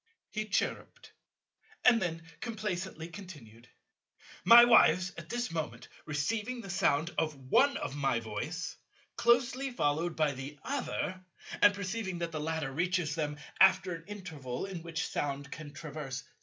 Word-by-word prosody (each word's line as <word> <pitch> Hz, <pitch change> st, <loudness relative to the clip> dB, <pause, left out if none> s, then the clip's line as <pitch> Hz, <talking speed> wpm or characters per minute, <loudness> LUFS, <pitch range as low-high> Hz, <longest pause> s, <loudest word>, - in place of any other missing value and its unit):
He 215 Hz, 0 st, -2 dB
chirruped, 215 Hz, -, -2 dB, 0.7 s
and 235 Hz, -2 st, +6 dB
then 165 Hz, -2 st, -2 dB, 0.2 s
complacently 190 Hz, -7 st, -4 dB
continued: 145 Hz, -, -12 dB, 0.7 s
"My 240 Hz, +1 st, +10 dB
wives 185 Hz, -6 st, +5 dB
at 170 Hz, -1 st, -9 dB
this 240 Hz, 0 st, -2 dB
moment 125 Hz, -8 st, -4 dB, 0.2 s
receiving 210 Hz, +11 st, -1 dB
the 195 Hz, -, -7 dB
sound 170 Hz, -4 st, +1 dB
of 155 Hz, -2 st, 0 dB
one 235 Hz, -, +3 dB
of 135 Hz, -, -4 dB
my 135 Hz, -5 st, +1 dB
voice, 115 Hz, +10 st, -5 dB, 0.4 s
closely 255 Hz, +3 st, +2 dB
followed 160 Hz, -, 0 dB
by 155 Hz, -2 st, +2 dB
the 140 Hz, +2 st, -7 dB
other, 245 Hz, -8 st, -3 dB, 0.4 s
and 205 Hz, 0 st, +7 dB
perceiving 195 Hz, -1 st, -3 dB
that 170 Hz, -1 st, -3 dB
the 155 Hz, -, -3 dB
latter 160 Hz, -3 st, -2 dB
reaches 175 Hz, +1 st, 0 dB
them 150 Hz, -2 st, -2 dB, 0.2 s
after 190 Hz, -1 st, +5 dB
an 165 Hz, 0 st, -8 dB
interval 160 Hz, -10 st, -5 dB
in 190 Hz, -4 st, -6 dB
which 165 Hz, 0 st, -3 dB
sound 140 Hz, 0 st, -3 dB
can 155 Hz, -1 st, -8 dB
traverse 145 Hz, -3 st, -6 dB
6. -, -, -24 dB
170 Hz, 145 wpm, -31 LUFS, 145-200 Hz, 0.7 s, My